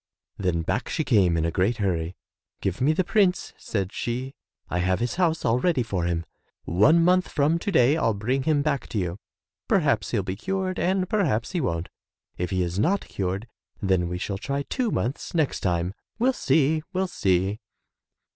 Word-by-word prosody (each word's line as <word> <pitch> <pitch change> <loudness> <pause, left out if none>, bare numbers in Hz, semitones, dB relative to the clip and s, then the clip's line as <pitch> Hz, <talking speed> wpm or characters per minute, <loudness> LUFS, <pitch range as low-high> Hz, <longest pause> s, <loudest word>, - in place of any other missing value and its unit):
Then 90 -4 0
back 120 - -2
she 160 - 0
came 95 - +3
in 80 - +1
a 85 - 0
great 100 +7 +1
hurry. 90 -4 -1 0.4
"Give 95 +4 -2
me 140 +4 +4
the 170 +4 +1
prince," 185 -1 +1
said 100 -2 -3
she; 125 +3 -3 0.3
"I 90 - -1
have 90 +1 +1
his 120 +7 -2
house 165 -3 +1
all 120 +1 +3
ready 160 -5 +2
for 95 -6 -2
him. 85 -1 -1 0.4
One 145 - +4
month 180 +1 +4
from 150 +4 +1
to 205 - -2
day 135 0 +4
I'll 115 -9 +1
bring 125 +7 0
him 145 0 +2
back 140 -3 -1
to - - -4
you. 90 0 -2 0.5
Perhaps 140 - +2
he'll 105 -5 0
be 95 0 -3
cured 190 - -2
and 185 +1 +1
perhaps 165 - 0
he 180 -3 -1
won't. 85 - -1 0.5
If 90 - -3
he 95 -2 0
is 90 +2 -2
not 190 - +2
cured 95 +4 -3 0.3
then 95 -4 +1
we 90 - -3
shall 95 +2 -3
try 140 +5 -2
two 250 - -1
months 135 - -2
next 155 -4 +1
time. 90 0 0 0.2
We'll 250 +4 +3
see, 155 - +2
we'll 190 +1 +1
see." 95 - 0
120 Hz, 190 wpm, -25 LUFS, -, 0.5 s, me